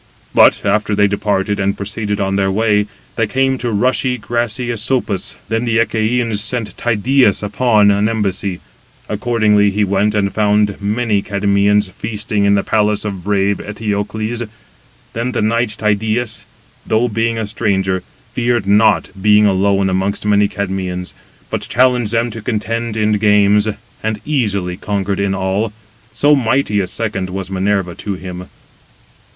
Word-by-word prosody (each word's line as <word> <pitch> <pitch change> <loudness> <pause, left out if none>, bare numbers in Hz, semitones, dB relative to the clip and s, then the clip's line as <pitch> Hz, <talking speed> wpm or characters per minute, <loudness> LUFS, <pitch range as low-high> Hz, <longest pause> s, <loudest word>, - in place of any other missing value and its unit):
But, - - +5
after 105 0 +1
they 105 0 +4
departed, 100 0 0
and 100 0 0
proceeded 105 +1 -3
on 95 -1 0
their 95 -1 +1
way, 105 0 +1 0.3
they 115 -2 +1
came 130 +3 0
to 120 - -2
rushy, 125 +3 +1
grassy 120 +1 -2
Asopus. 115 -3 -1
Then 115 +1 -1
the 115 -2 +1
Achæans 115 0 +1
sent 110 -2 -1
Tydeus 120 -1 +2
upon 105 0 +3
an 100 +2 +2
embassy. 100 -4 -2 0.4
188 - - -6
Accordingly 105 -2 +2
he 105 +1 0
went, 100 +2 +1
and 100 -2 0
found 105 -1 +1
many 105 0 0
Cadmeans 100 0 +1
feasting 105 0 -2
in 100 0 +4
the 100 - +1
palace 105 -1 +1
of 95 -4 -4
brave 100 0 +1
Eteocles. 105 +2 -3 0.7
Then 120 +2 -2
the 120 - -1
knight 115 0 0
Tydeus, 110 +1 -1 0.4
though 110 +3 +1
being 115 +1 -1
a 110 - -2
stranger, 95 -3 -1 0.3
feared 120 -3 0
not, 105 +1 +3
being 105 +1 +5
alone 100 0 +2
amongst 95 +2 -1
many 105 0 +3
Cadmeans: 95 -3 -4 0.4
but - - -2
challenged 125 -2 +2
them 115 +1 0
to 115 - -7
contend 115 0 -2
[in 105 0 +1
games], 105 0 +4 0.3
and 110 -1 -2
easily 100 -11 -1
conquered 100 -1 -2
in 100 -1 0
all, 95 +4 -1 0.4
so 145 +1 +4
mighty 130 -4 +1
a 95 - -1
second 95 -2 -3
was 95 0 -5
Minerva 95 -1 0
to 100 +3 -5
him. 90 0 -8
105 Hz, 150 wpm, -16 LUFS, 100-115 Hz, 0.7 s, But